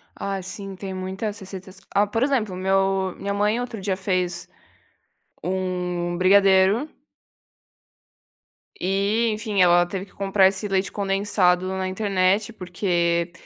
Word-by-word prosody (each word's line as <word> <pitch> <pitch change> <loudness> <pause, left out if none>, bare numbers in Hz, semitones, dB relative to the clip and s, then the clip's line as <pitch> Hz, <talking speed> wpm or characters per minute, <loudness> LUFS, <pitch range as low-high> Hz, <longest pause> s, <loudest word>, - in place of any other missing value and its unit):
Ai 195 -1 -3
sim 195 +1 -7
tem 190 0 -6
muitas 190 +3 -4
receitas. 190 -1 -9
Ah, 205 +1 +3
por 225 +4 0
exemplo, 240 -9 0
meu 190 0 +1
minha 200 0 -3
mãe 210 +3 +1
outro 245 -3 -5
dia 190 -1 -1
fez 180 -2 -2 0.9
um 180 -1 -2
brigadeiro 195 - +4 1.9
e 200 +5 +1
enfim 210 -2 -1
ela 175 0 +5
teve 190 +2 -5
que - - -23
comprar 195 -1 +3
esse 195 +2 -2
leite 195 -1 0
condensado 195 -2 +1
na 190 0 -2
internet 195 +2 +1
porque 175 -3 -1
190 Hz, 125 wpm, -23 LUFS, 185-200 Hz, 1.9 s, ela